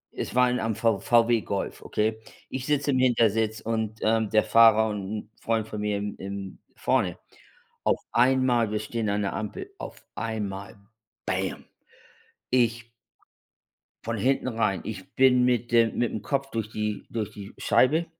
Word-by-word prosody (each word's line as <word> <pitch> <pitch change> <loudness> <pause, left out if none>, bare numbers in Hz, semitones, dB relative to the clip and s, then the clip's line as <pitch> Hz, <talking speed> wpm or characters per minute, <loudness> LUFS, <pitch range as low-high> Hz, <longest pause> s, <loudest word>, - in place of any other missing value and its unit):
es - - -4
war 125 0 +6
ein 125 0 0
am 110 -1 -1
V 115 -3 +1
VW 115 +1 +3
Golf, 100 -1 -4
okay? 110 +1 -1 0.3
Ich 130 -1 -4
sitze 145 -1 +1
im 130 - +2
Hintersitz 110 -3 +2
und, 110 -1 -2
ähm, 110 -1 +2
der 110 0 +4
Fahrer 110 0 +6
und 105 -1 -3
'n 105 0 -5
Freund 115 -1 0
von 105 -1 -5
mir 105 -1 0
im 105 0 -4
im 95 -1 -7 0.2
vorne. - - 0 0.7
Auf - - +2
einmal, 125 -2 +3
wir 105 - -1
stehen 110 0 -3
an 100 +1 0
'ner 100 - -2
Ampel, 110 - -5
auf - - -9
einmal: 105 -3 -4 0.5
„Bäm." - - -2 0.9
Ich 120 -2 +1 1.1
von 115 0 -3
hinten 130 +5 +1
rein. 110 -7 0
Ich 95 -4 -8
bin 125 -1 +5
mit 120 -1 +1
dem 115 -1 +3
mitm 115 -3 -1
Kopf 135 +1 -2
durch 110 -2 -3
die 105 -2 -3
durch 110 -3 -3
die 100 0 -10
Scheibe. 155 +6 +3
110 Hz, 160 wpm, -26 LUFS, 105-120 Hz, 1.1 s, war